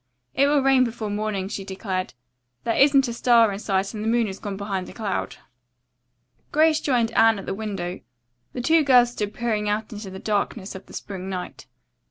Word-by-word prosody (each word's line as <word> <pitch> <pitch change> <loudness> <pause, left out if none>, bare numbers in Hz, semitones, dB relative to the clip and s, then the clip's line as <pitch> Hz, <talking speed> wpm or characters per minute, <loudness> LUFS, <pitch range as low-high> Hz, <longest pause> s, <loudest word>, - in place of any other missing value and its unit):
"It 275 +2 +3
will 290 -1 +3
rain 270 -1 +5
before 225 -3 -3
morning," 205 -2 -2
she 200 -1 -5
declared. 190 - -4 0.5
"There 230 - 0
isn't 275 -1 +5
a 235 - -3
star 235 -2 +4
in 195 - -5
sight 195 -1 -1
and 215 -1 -5
the - - -2
moon 235 0 +2
has 195 -2 -6
gone 200 -2 -5
behind 195 -2 -4
a - - -10
cloud." 215 -4 -3 1.2
Grace 315 +1 +3
joined 240 -5 +1
Anne 225 -1 +4
at 195 - -7
the - - -3
window. 195 -4 -4 0.5
The 250 - -3
two 320 +5 +4
girls 250 -3 +5
stood 210 -3 -3
peering 215 -2 -1
out 215 +1 -2
into 205 -1 -7
the 190 - -8
darkness 205 0 -2
of 190 0 -10
the - - -14
spring 190 -1 -6
night. 185 -2 -6
215 Hz, 200 wpm, -24 LUFS, 195-240 Hz, 1.2 s, rain